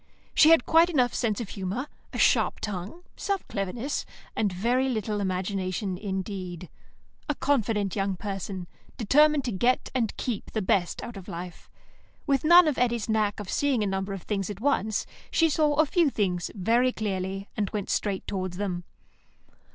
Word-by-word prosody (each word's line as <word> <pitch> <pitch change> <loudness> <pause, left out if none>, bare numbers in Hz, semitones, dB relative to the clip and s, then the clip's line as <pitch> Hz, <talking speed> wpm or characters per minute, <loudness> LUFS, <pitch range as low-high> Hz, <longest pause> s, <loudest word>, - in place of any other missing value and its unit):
She 310 - +7
had 330 0 +6
quite 330 +2 +5
enough 255 -7 +2
sense 220 -4 0
of 215 - -6
humour, 200 +6 -3 0.3
a - - -5
sharp - - +3
tongue, 210 - -5
some 400 -1 -1
cleverness, 225 +8 -3 0.3
and 210 -3 +1
very 240 +8 +1
little 215 -3 -1
imagination 185 0 -2
indeed. 185 -2 -5 0.6
A 295 - +1
confident 225 -8 0
young 195 -1 0
person, 195 -1 -5 0.3
determined 295 +5 +4
to 245 - -1
get 240 +6 +1
and 235 -5 -1
keep 235 -6 -4
the 220 - 0
best 185 -2 +1
out 235 -3 -7
of 190 - -10
life. 175 +1 -8 0.6
With 275 -3 +1
none 345 +2 +8
of 295 - 0
Eddy's 235 -2 0
knack 215 -2 +1
of 205 -2 -6
seeing 275 -6 +1
a - - 0
number 195 0 -2
of 195 - -7
things 200 -2 -2
at 205 -2 -6
once, 220 -5 +1 0.2
she 325 -1 +3
saw 300 -1 +2
a 310 +2 +4
few 335 0 +3
things 185 -8 -1
very 235 +6 +2
clearly, 195 -3 -3
and 205 -3 -1
went 205 -3 -3
straight 200 -3 -1
towards 185 -2 -3
them. 185 -3 -2
210 Hz, 170 wpm, -27 LUFS, 190-255 Hz, 0.6 s, none